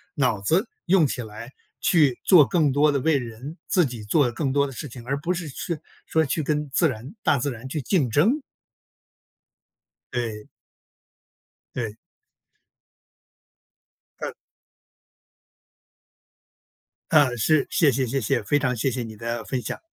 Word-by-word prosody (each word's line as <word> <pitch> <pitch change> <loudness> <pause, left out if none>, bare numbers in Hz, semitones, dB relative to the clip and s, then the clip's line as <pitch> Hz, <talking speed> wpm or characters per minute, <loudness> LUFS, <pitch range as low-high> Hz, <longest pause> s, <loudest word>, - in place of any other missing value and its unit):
脑 125 -8 +1
子 175 - +2 0.2
用 175 -4 +4
起 130 - -3
来， 110 +3 -9 0.3
去 150 -8 +3
做 170 -7 +7
更 155 -2 +2
多 145 +2 +4
的 140 - 0
为 155 +2 +2
人、 125 +6 -7
自 185 -3 +3
己 120 -5 -6
做 120 +4 +2
更 135 +3 -2
多 140 0 +2
的 - - -8
事 145 +4 -6
情， 120 -1 -10
而 140 +1 0
不 175 +4 0
是 170 -3 -5
去 160 +4 -4 0.3
说 160 - +2
去 155 +2 -1
跟 150 0 -1
自 160 +4 +3
然 130 - -6
大 140 - +3
自 140 - -1
然 120 +1 -8
去 150 +3 -3
竞 135 - +1
争。 205 - +3 1.7
对。 115 -3 -4 1.3
对。 115 -4 -3 2.3
嗯。 - - -3 2.8
啊， 150 -3 +6
是， 155 +5 +3
谢 150 -4 +4
谢 130 +1 0
谢 135 +3 -1
谢， 105 - +1
非 145 +7 +2
常 130 -3 0
谢 130 +4 0
谢 125 - -3
你 110 -1 -8
的 115 +1 -4
分 130 - -2
享。 105 - -5
135 Hz, 155 characters per minute, -24 LUFS, 120-155 Hz, 2.8 s, 做